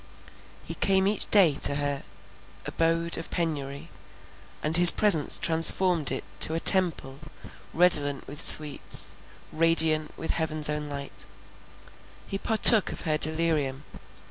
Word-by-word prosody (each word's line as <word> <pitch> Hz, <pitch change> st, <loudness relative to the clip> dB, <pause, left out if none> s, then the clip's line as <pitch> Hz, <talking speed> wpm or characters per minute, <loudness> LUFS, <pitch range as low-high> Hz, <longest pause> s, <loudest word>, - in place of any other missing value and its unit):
He -, -, -9 dB
came 190 Hz, -1 st, -1 dB
each 205 Hz, +1 st, -1 dB
day 190 Hz, -8 st, +3 dB
to 140 Hz, -, +2 dB
her 145 Hz, -1 st, -5 dB, 0.6 s
abode 165 Hz, 0 st, -3 dB
of 165 Hz, -, -11 dB
penury, 150 Hz, -2 st, -7 dB, 0.7 s
and 155 Hz, +2 st, -3 dB
his 175 Hz, 0 st, +9 dB
presence 180 Hz, -8 st, +2 dB
transformed 165 Hz, -1 st, +3 dB
it 135 Hz, -, -7 dB, 0.2 s
to 160 Hz, -, -1 dB
a -, -, -4 dB
temple 165 Hz, -8 st, +1 dB, 0.5 s
redolent 145 Hz, -5 st, -1 dB
with 145 Hz, +3 st, -9 dB
sweets, 150 Hz, -2 st, +3 dB, 0.4 s
radiant 160 Hz, -1 st, -1 dB
with 165 Hz, -, -6 dB
heaven's 155 Hz, -2 st, -2 dB
own 150 Hz, 0 st, -7 dB
light; 140 Hz, -1 st, -9 dB, 1.0 s
he 195 Hz, -, -8 dB
partook 220 Hz, -1 st, +2 dB
of -, -, -10 dB
her 155 Hz, -2 st, -4 dB
delirium. 155 Hz, -4 st, -3 dB
160 Hz, 125 wpm, -23 LUFS, 145-170 Hz, 1.0 s, his